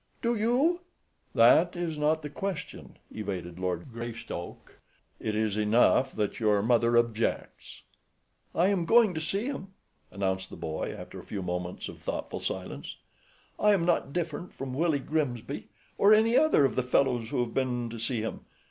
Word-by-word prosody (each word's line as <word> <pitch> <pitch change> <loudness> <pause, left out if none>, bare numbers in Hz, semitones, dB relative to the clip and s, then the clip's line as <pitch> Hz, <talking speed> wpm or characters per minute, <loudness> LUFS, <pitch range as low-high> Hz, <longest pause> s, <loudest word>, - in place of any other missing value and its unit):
"Do 235 0 +2
you?" 250 +11 +2 0.6
"That - - +6
is 175 -2 -2
not 150 +1 +1
the 150 - -4
question," 185 -3 -5
evaded 90 -5 -5
Lord 90 +5 -3
Greystoke. 115 -6 -7 0.4
"It 110 - -2
is 110 -1 0
enough 120 +5 +4
that 105 -1 -2
your 105 -3 +3
mother 120 0 +3
objects." 115 -1 -1 0.7
"I 180 +3 +4
am 190 -4 +1
going 225 -4 +5
to 160 - -3
see 195 +7 -1
him," 195 -8 -5 0.3
announced 95 -1 -2
the - - -9
boy, 80 0 -4
after - - -9
a - - -10
few 100 -2 -5
moments 90 0 -4
of - - -10
thoughtful - - -4
silence. - - -5 0.6
"I 210 0 +5
am 175 -4 +2
not 170 -5 +1
different 170 +1 -4
from 135 -1 -5
Willie 160 +2 +2
Grimsby, 140 -3 -3 0.3
or 205 +2 +7
any 225 +2 +3
other 310 - +5
of - - +1
the - - +1
fellows 125 -2 +1
who 125 - 0
have 120 -1 -3
been 125 -2 0
to 115 - -7
see 115 0 -1
him. 110 - -4
130 Hz, 165 wpm, -29 LUFS, 110-175 Hz, 0.7 s, or